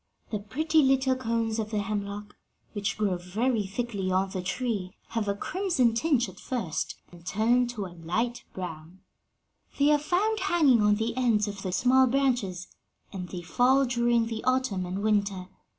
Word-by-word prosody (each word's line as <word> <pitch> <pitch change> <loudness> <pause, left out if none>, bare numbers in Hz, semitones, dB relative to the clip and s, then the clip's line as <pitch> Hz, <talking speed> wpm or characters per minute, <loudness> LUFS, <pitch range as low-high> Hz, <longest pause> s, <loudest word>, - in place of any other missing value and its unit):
"The 210 - -1
pretty 310 +10 +1
little 265 -1 +3
cones 230 -3 -1
of 215 -1 -2
the 215 - -2
hemlock, 205 0 -4 0.4
which 200 -1 -2
grow 200 -4 +1
very 210 +5 -1
thickly 200 -2 -3
on 190 +1 +1
the 185 - -3
tree, 195 0 -3
have 225 -3 -2
a 200 - 0
crimson 325 - +1
tinge 245 0 +2
at - - -12
first, 225 - -3 0.2
and 175 -1 -14
turn 230 +6 +2
to 230 -5 -4
a 180 - -9
light 200 +9 -2
brown. 175 0 -8 0.8
They 290 +1 +4
are 295 - +4
found 395 +8 +1
hanging 325 - +4
on 210 0 +4
the 225 +2 -2
ends 230 -5 +2
of 200 -1 -6
the 185 - -3
small 255 +6 +4
branches, 240 -9 0 0.5
and 180 -2 -5
they 175 -2 -6
fall 260 +9 +3
during 240 -1 +2
the 225 -1 -5
autumn 255 -8 0
and 190 +3 -4
winter. 200 -3 0
220 Hz, 170 wpm, -28 LUFS, 195-255 Hz, 0.8 s, They